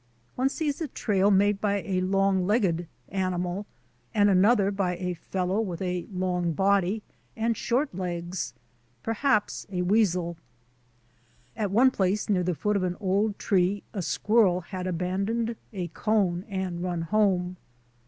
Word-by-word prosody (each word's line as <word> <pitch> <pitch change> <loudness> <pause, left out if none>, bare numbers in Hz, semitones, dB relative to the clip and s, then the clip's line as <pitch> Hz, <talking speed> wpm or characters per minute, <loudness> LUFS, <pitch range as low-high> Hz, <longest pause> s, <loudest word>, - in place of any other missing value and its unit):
One 260 +2 +2
sees 295 0 -2
a 320 - -1
trail 200 -6 +1
made 205 0 +3
by 200 -1 +1
a 185 -2 -1
long 190 0 +2
legged 185 -6 +1 0.2
animal 185 +1 -2 0.5
and 205 -1 +5
another 200 +1 +4
by 190 -3 -1
a 180 0 -2
fellow 185 +3 -2
with 180 -6 -4
a 180 -2 -2
long 180 -2 -1
body 200 +3 +2 0.3
and 230 +1 +1
short 250 +5 0
legs 175 -3 -4 0.2
— 120 0 -39
perhaps 225 -1 0
a 180 -1 -1
weasel. 180 -4 +2 1.2
At 215 -3 -1
one 245 +7 +5
place 200 -1 0
near 190 -3 +3
the 180 -1 0
foot 210 +5 0
of - - -1
an 180 -1 -1
old 200 +2 +1
tree 195 0 +1
a 195 - -2
squirrel 200 0 +2
had 185 +1 -5
abandoned 195 +6 -1 0.2
a 185 -4 -3
cone 195 -2 0
and 190 -3 -3
run 175 -2 -2
home. 185 -1 +1
190 Hz, 150 wpm, -27 LUFS, 180-210 Hz, 1.2 s, and